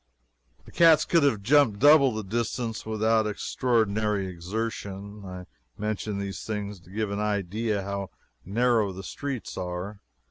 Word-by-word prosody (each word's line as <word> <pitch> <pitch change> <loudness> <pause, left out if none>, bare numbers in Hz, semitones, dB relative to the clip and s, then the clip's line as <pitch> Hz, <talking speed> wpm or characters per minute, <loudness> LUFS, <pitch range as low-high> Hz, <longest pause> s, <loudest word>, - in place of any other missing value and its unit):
The - - -14
cats 165 -2 +6
could 170 - +3
have 115 -8 +2
jumped 125 -3 +4
double 145 +1 +6
the 110 -1 -4
distance 115 +2 -3
without 110 0 +2
extraordinary 105 -2 0
exertion. 100 +2 -5
I 90 -1 -8 0.3
mention 105 -1 -3
these 100 -2 -5
things 105 -2 -4
to 85 +1 -20
give 105 +1 -2
an 100 - -2
idea 105 +1 -1
of - - -8
how 100 -1 -4 0.3
narrow 110 0 +1
the 95 +1 -8
streets 140 +2 -5
are. 90 +3 -5
105 Hz, 145 wpm, -27 LUFS, 100-115 Hz, 0.3 s, cats